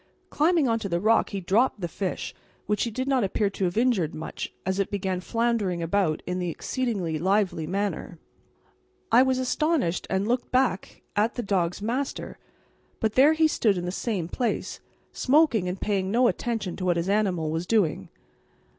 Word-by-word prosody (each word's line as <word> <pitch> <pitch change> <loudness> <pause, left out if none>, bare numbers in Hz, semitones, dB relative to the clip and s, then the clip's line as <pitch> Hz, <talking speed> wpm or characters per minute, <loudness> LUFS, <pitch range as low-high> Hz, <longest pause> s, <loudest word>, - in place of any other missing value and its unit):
Climbing 315 -1 +3
on 230 -1 +1
to 205 -3 -4
the 170 -1 0
rock 220 +4 +3
he 200 - -3
dropped 210 +6 +2
the 175 - -2
fish, 185 +2 -4 0.3
which 210 +2 0
he - - -2
did 255 +4 -3
not 265 -4 +2
appear 200 +1 0
to 195 - -2
have 175 +3 -2
injured 225 -10 +2
much, 160 - -6
as 190 +1 -1
it 195 - 0
began 190 -2 -2
floundering 225 -6 0
about 165 -2 0
in 180 0 -2
an 175 - -1
exceedingly 190 - -2
lively 190 -3 +1
manner. 190 -2 -3 0.9
I 235 +3 +7
was 260 0 +2
astonished 260 - 0
and 190 +2 0
looked 245 +1 0
back 255 -7 0
at 215 +3 +1
the 245 - -3
dog's 185 -2 -1
master; 255 +5 -3 0.6
but 220 -1 0
there 285 +4 +6
he 315 0 +4
stood 215 -10 +1
in 175 - -3
the 180 - -2
same 195 -4 -2
place, 240 +6 -2 0.3
smoking 265 - +3
and 180 +1 -3
paying 195 -2 -1
no 240 +4 +4
attention 225 -7 -2
to 185 - -4
what 175 -1 +2
his 170 +1 -1
animal 190 -6 +1
was 165 +2 -3
doing. 200 -9 +1
205 Hz, 180 wpm, -26 LUFS, 180-240 Hz, 0.9 s, I